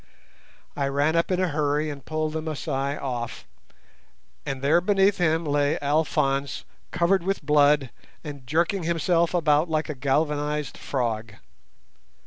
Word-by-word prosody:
I 140 - 0
ran 145 +3 +1
up 165 - +1
in 185 -1 +1
a 185 -1 +1
hurry 150 0 0
and 140 -2 -9
pulled 155 +1 -2
the 160 - -2
Masai 145 -3 -3
off, 120 -4 -5 1.0
and 135 -1 -4
there 160 +5 +4
beneath 195 +1 +2
him 165 -1 +1
lay 145 0 +1
Alphonse 140 -2 0 0.2
covered 175 +2 +2
with 195 +3 -2
blood 145 -3 +4 0.3
and 140 -5 -8
jerking 170 +6 +1
himself 170 +1 +1
about 155 -1 +3
like 155 0 -1
a - - -1
galvanized 150 +2 -1
frog. 115 -4 -3
150 Hz, 135 wpm, -25 LUFS, 140-165 Hz, 1.0 s, there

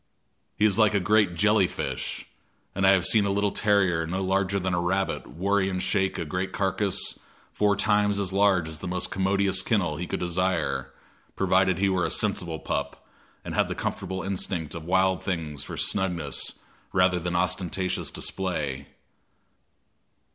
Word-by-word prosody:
He 105 - +3
is 105 0 +2
like 110 -1 +4
a - - +4
great 100 -1 +2
jelly 105 +1 +4
fish, - - -4 0.5
and 95 0 +2
I - - +8
have 95 -2 +2
seen 110 -2 +5
a - - 0
little 100 +1 +1
terrier 95 -6 +2
no 95 +3 -2
larger 95 +1 +1
than 95 -1 -1
a 85 - +1
rabbit 95 +2 -1
worry 95 +2 0
and 95 - -2
shake 95 0 0
a 85 - -3
great 90 +4 -3
carcass 100 0 0 0.3
four 105 -1 +2
times 105 0 +2
as 95 -2 -2
large 95 -4 +3
as 80 0 -7
the - - -6
most 90 0 -1
commodious 95 0 +1
kennel 90 -9 0
he 90 - -4
could - - -3
desire, 85 -6 -1 0.4
provided 95 -1 +2
he 100 +1 +2
were 95 -2 +1
a - - 0
sensible 90 -6 -1
pup - - -4 0.4
and - - -5
had - - +2
the - - -4
comfortable 95 0 -4
instinct 90 -4 -2
of 80 -2 -7
wild 95 +1 +2
things 80 -6 -3
for - - -7
snugness 90 -7 -1 0.4
rather 90 -1 +3
than 90 +1 -3
ostentatious 90 +1 -1
display. 75 -8 -3
95 Hz, 170 wpm, -26 LUFS, 90-100 Hz, 0.5 s, I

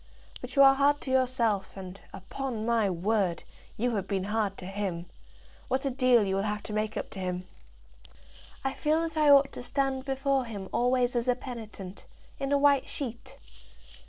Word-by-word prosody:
But - - -7
you 275 - +7
are 270 0 +8
hard 285 +1 +3
to 260 - -5
yourself, 235 -7 +1
and, 190 0 -8
upon 225 +3 -5
my 230 -3 +2
word, 185 -1 0 0.3
you 240 +1 0
have 195 -1 -3
been 190 -1 -1
hard 210 -1 -1
to 180 - -8
him. 190 -3 -3 0.6
What 265 +1 -1
a 275 - +1
deal 250 -3 +4
you 195 -1 0
will - - +1
have 210 0 -2
to 215 - -7
make 215 0 -1
up - - -4
to 195 - -7
him!" 180 0 -3 1.2
"I 270 0 -1
feel 310 +2 +1
that 330 -1 -3
I 305 -1 +4
ought 280 -1 +7
to - - -8
stand 270 +1 -1
before 270 -1 0
him 200 -5 -7
always 250 0 +2
as 240 +1 0
a 250 - +3
penitent, 220 -7 -9 0.3
in 275 0 -2
a 285 - +4
white 280 -1 +3
sheet." 240 -5 -6
235 Hz, 190 wpm, -29 LUFS, 200-270 Hz, 1.2 s, are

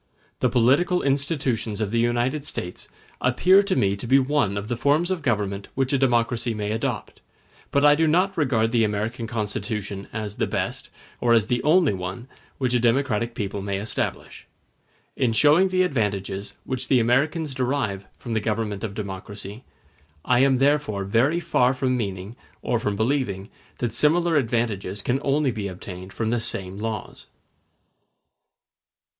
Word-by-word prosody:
The 125 - +2
political 135 - +3
institutions 135 -6 0
of 105 -2 -1
the 115 - +1
United 120 +5 0
States 90 -10 -6 0.3
appear 180 +10 +5
to 200 -2 -1
me 100 - +2
to 110 - -6
be 135 - +5
one 130 -7 +1
of 100 +1 -4
the 120 - -1
forms 145 +9 +2
of 185 -3 -1
government 100 -6 -1
which 135 +1 0
a - - +4
democracy 120 -2 +1
may 105 0 -2
adopt; 110 0 -3 0.5
but 140 +1 +2
I 145 - +8
do 160 +2 +2
not 185 +5 +2
regard 115 -8 +1
the 115 -2 +3
American 110 +3 -2
Constitution 105 -2 -3
as 105 -2 -5
the - - 0
best, - - -3 0.3
or 120 -1 +3
as 115 -3 +4
the 120 +2 0
only 160 - +4
one, 95 +6 -6 0.3
which 130 -2 0
a 125 - +3
democratic 120 -1 +1
people 100 -1 -3
may 100 0 -2
establish. 105 +3 -4 0.7
In 125 -4 +1
showing 150 +10 +5
the 185 0 +2
advantages 100 - -2
which 130 -1 -3
the 130 - +4
Americans 140 +6 +1
derive 125 -7 -2
from 120 - -6
the 110 - +2
government 105 -1 -2
of 100 -3 -4
democracy, 100 +2 -6 0.6
I 125 -1 +3
am 135 0 +4
therefore 140 -7 +1
very 120 - +2
far 130 -6 +2
from 130 -1 0
meaning, 100 -2 -4 0.3
or 120 - 0
from 105 -2 -1
believing, 110 -4 -1 0.3
that 120 -3 -2
similar 165 +6 +3
advantages 115 -7 -1
can 130 +2 0
only 140 -1 +1
be 105 -3 -4
obtained 95 0 -8
from 110 +1 -2
the 120 - +1
same 100 -4 -4
laws. 110 -1 -5
120 Hz, 160 wpm, -24 LUFS, 105-140 Hz, 0.7 s, I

